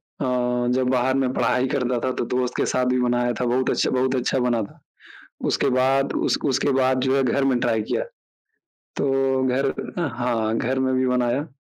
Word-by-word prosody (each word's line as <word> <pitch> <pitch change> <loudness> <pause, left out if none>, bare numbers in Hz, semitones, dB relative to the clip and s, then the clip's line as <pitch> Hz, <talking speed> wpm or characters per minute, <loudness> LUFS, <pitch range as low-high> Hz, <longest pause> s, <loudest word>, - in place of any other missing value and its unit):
अ, 125 -1 -2
जब 130 -1 +1
बाहर 130 0 +1
मैं 135 -2 +1
पढ़ाई 125 +1 +1
करता 125 -3 0
था 130 - 0
तो - - 0
दोस्त 125 0 -2
के - - +1
साथ 125 - +1
भी 125 - +1
बनाया 120 0 +1
था, 125 - 0
बहुत 125 +2 +1
अच्छा - - +1
बहुत 130 +1 0
अच्छा 130 +1 0
बना 120 -2 +1
था। 100 - -12 0.7
उसके - - +1
बाद, 135 +2 +2
उस - - +1
उसके 135 0 +1
बाद 130 0 +2
जो 130 0 +2
है 135 - +2
घर 130 +2 +1
में 130 -2 +2
ट्राई 115 -2 +1
किया, - - 0 0.9
तो 135 -1 +1
घर 135 +2 +1 0.3
हाँ, 120 -7 -1
घर 130 +3 -1
में 130 0 +1
भी 130 0 +1
बनाया। 125 +3 0
130 Hz, 195 wpm, -23 LUFS, 125-130 Hz, 0.9 s, बाद